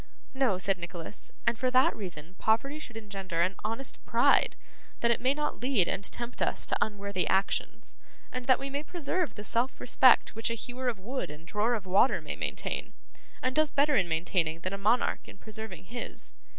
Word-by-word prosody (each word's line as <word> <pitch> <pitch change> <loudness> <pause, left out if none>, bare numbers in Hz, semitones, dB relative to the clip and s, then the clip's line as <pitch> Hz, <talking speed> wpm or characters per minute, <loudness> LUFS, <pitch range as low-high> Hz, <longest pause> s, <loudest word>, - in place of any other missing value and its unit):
'No,' 265 -8 +2
said 190 0 0
Nicholas, 170 +2 -6
'and 235 -1 +1
for 255 - +2
that 255 +1 +4
reason 175 -4 -7
poverty 275 +7 +1
should 240 -6 -9
engender 195 -5 -3
an 180 +3 +2
honest 225 +5 0
pride, - - +4 0.5
that 235 - +4
it 235 - +1
may 260 +3 +3
not 295 0 -2
lead 245 -9 +3
and 200 - 0
tempt 240 +4 -3
us - - +1
to - - 0
unworthy 200 -3 -1
actions, 195 +1 -1 0.3
and 250 -1 -5
that 255 - +6
we 275 - -5
may 280 +1 -3
preserve 345 +1 -2
the 210 - -7
self 235 +5 0
respect 255 +1 +5
which 225 +1 0
a 230 - -1
hewer 250 +2 -5
of 240 -4 0
wood 240 - -4
and 150 +2 -10
drawer 210 +5 +1
of 210 -4 -5
water 190 +3 +4
may 155 -2 -5
maintain, - - -2 0.5
and 255 0 0
does 310 -1 +4
better 290 0 +3
in 185 -7 +2
maintaining 165 0 0
than 185 +3 -3
a - - -2
monarch 220 +5 +1
in - - -12
preserving 220 -3 -7
his. 235 +6 -7
220 Hz, 195 wpm, -29 LUFS, 190-255 Hz, 0.5 s, that